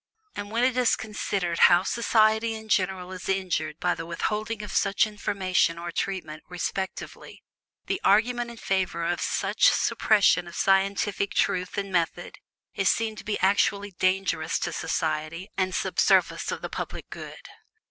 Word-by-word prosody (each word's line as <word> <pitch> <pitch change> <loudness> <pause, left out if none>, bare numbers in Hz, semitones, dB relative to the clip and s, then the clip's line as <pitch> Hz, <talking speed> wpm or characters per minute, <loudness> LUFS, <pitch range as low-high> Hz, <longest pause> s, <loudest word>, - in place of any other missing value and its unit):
And 205 0 -5
when 230 +3 0
it 255 -1 +2
is 250 -2 +3
considered 195 -5 -3
how 175 0 +5
society 225 0 +2
in 220 0 -10
general 185 -2 0
is 185 0 -7
injured 170 -5 -1
by 175 0 +1
the - - -6
withholding 210 +6 -3
of 210 - -7
such 200 +1 +2
information 190 -5 0
or 170 0 -5
treatment, 165 -5 -4
respectively, 185 +2 -5 0.4
the 390 - -2
argument 240 +4 +3
in 235 - -10
favor 185 -5 -1
of 175 +1 -1
such - - +2
suppression 200 -4 +3
of 175 - -10
scientific 195 +1 +1
truth 180 0 0
and 200 -1 -3
method 175 0 -2 0.3
is 195 -1 +1
seen 225 -1 0
to - - -8
be 210 - -2
actually 200 +1 +2
dangerous 185 -3 0
to 175 - -3
society 160 +5 -3
and 185 -1 -1
sub - - -2
service - - +3
of - - -5
the - - -2
public - - -6
good. - - -9
195 Hz, 155 wpm, -26 LUFS, 175-210 Hz, 0.4 s, how